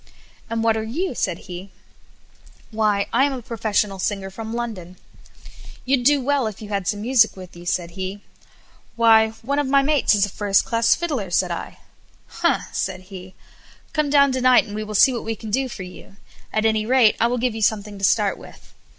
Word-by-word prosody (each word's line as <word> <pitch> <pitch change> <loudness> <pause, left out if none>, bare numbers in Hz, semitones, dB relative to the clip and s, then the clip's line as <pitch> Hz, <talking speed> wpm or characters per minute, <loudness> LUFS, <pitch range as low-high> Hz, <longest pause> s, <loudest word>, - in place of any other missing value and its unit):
"And 230 0 -2
what 225 -1 +3
are 220 - -2
you?" 280 +9 -3
said 185 -7 -3
he. 180 +1 -8 1.0
"Why, 215 -2 +1
I 255 +4 +4
am 285 - -1
a 255 - -5
professional 210 -4 -1
singer 195 0 -3
from 220 +3 -7
London." 215 -7 -5 0.9
"You'd 260 -1 +1
do 285 +3 +4
well, 280 -3 +1
if 210 -3 -7
you 210 - -9
had 200 -3 -2
some 205 -1 -1
music 230 -3 +3
with 185 -2 -11
you," 175 0 -11
said 175 -1 -1
he. 190 +2 -6 0.7
"Why, 225 -1 +5
one 280 +4 -1
of 290 - 0
my 275 +1 +4
mates 285 -6 +3
is 200 -1 +3
a - - -7
first 200 0 +1
class 230 -1 +2
fiddler," 285 - -3
said 175 - +1
I. - - -6 0.5
"Humph!" - - -1
said 185 -1 -3
he; 185 0 -10 0.6
"come 305 -2 0
down 280 -1 +5
to 260 0 -2
night, 255 0 +6
and 205 - -9
we 215 +1 -3
will 215 0 -6
see 260 +6 +6
what 235 - -4
we 225 0 -3
can 220 -1 -8
do 265 +3 0
for 195 - -7
you; 180 +1 -12 0.4
at 215 0 0
any 220 -1 +2
rate, 240 -1 +4
I 230 - +3
will 245 +1 -1
give 245 -1 0
you 220 - -6
something 205 -1 -1
to - - -10
start 205 0 +2
with." - - -15
220 Hz, 210 wpm, -22 LUFS, 200-250 Hz, 1.0 s, night